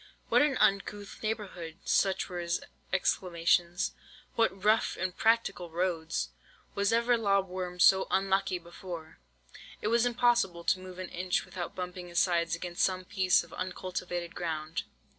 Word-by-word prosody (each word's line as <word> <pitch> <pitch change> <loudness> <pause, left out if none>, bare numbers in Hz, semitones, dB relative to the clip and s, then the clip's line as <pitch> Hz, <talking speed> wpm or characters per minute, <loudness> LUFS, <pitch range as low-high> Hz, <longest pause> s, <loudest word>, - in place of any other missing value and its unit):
"'What - - +5
an 290 -3 +3
uncouth 200 +1 0
neighbourhood!' 190 -7 -4
Such 195 -1 +2
were 180 -2 -5
his 170 0 -1 0.3
exclamations. 175 -1 +1 0.4
'What 210 -4 +1
rough 215 +1 +3
impracticable 185 -1 +1
roads! 165 - -1 0.4
Was 200 0 +1
ever 235 +1 +3
lob 200 -3 +2
worm 180 -1 -5
so 190 +2 +6
unlucky 195 -1 +1
before!' 170 - -9 0.6
It 210 - -1
was 235 +1 +3
impossible 240 -8 +2
to 185 - +2
move 185 -1 -10
an 185 -1 -5
inch 180 +1 -1
without 180 -2 -6
bumping 180 -1 -5
his 175 0 -7
sides 170 -2 +2
against 175 0 -4
some 185 -1 +1
piece 190 -2 +3
of 170 - -15
uncultivated 180 -1 -4
ground. 160 -3 -3
185 Hz, 140 wpm, -30 LUFS, 175-195 Hz, 0.6 s, so